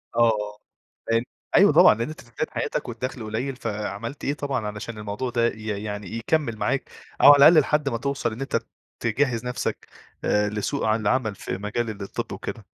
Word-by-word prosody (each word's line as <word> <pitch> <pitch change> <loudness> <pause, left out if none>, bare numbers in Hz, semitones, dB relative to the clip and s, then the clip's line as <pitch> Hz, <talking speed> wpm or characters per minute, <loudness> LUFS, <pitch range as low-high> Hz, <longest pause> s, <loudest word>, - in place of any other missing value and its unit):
آه، - - +1
آه. 105 -3 +2 0.5
فهمت. 115 +1 +2 0.3
أيوه - - +7
طبعًا. - - +8
لإن 115 +4 -3
أنت 155 - -9
في 120 - -20
بداية - - -2
حياتك - - -2
والدَخل 120 +1 -5
قليّل، 115 +5 -3
فعملت 110 +2 -5
إيه 140 - 0
طبعًا 140 -6 -2
علشان 105 +2 -6
الموضوع 105 +4 -4
ده 120 -1 +2
ي 110 -2 -4
يعني 105 -2 -5
يكمّل 115 -1 0
معاك - - -1 0.3
أو - - +8
على - - +7
الأقل 160 0 +8
لحد 150 0 +1
ما 115 - -2
توصل 135 -1 -2
إن 115 - -8
أنت 135 - -2
ت 115 0 0 0.3
تجهّز 120 0 0
نفْسك 125 0 -3 0.4
آآ 105 0 +2
لسوق 105 +7 -2
عن 110 +1 +2
العمل 110 0 +1
في 95 - -5
مجال 105 +4 -2
الطِب 100 - -5
وكده؟ - - -6
115 Hz, 190 wpm, -24 LUFS, 105-130 Hz, 0.5 s, طبعًا